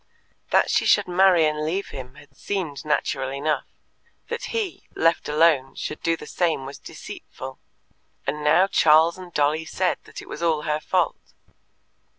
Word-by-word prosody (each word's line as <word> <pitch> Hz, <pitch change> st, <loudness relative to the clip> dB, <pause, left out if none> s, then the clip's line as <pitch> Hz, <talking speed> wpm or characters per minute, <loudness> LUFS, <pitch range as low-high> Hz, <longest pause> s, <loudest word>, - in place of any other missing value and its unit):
That -, -, +3 dB
she -, -, +2 dB
should 205 Hz, -2 st, +4 dB
marry 180 Hz, -2 st, +5 dB
and 150 Hz, 0 st, 0 dB
leave 180 Hz, +6 st, -2 dB
him 130 Hz, -2 st, -9 dB
had 145 Hz, -, -17 dB
seemed 175 Hz, -8 st, -4 dB
natural 145 Hz, -3 st, 0 dB
enough; 145 Hz, +3 st, -1 dB, 0.6 s
that 470 Hz, 0 st, -3 dB
he, 435 Hz, -6 st, -4 dB
left 165 Hz, -2 st, +2 dB
alone, 150 Hz, -3 st, +3 dB
should 150 Hz, -, -5 dB
do 165 Hz, 0 st, +1 dB
the 150 Hz, -, -10 dB
same 160 Hz, -5 st, -1 dB
was 140 Hz, +1 st, -8 dB
deceitful; -, -, -9 dB, 0.7 s
and 150 Hz, +2 st, -2 dB
now 170 Hz, +5 st, +5 dB
Charles 165 Hz, -1 st, +4 dB
and 180 Hz, -1 st, -10 dB
Dolly 150 Hz, +1 st, +1 dB
said 180 Hz, +2 st, -1 dB
that -, -, -10 dB
it -, -, -11 dB
was 150 Hz, -, -7 dB
all 160 Hz, -3 st, +1 dB
her 150 Hz, 0 st, 0 dB
fault. 180 Hz, +2 st, -1 dB
155 Hz, 165 wpm, -24 LUFS, 150-180 Hz, 0.7 s, marry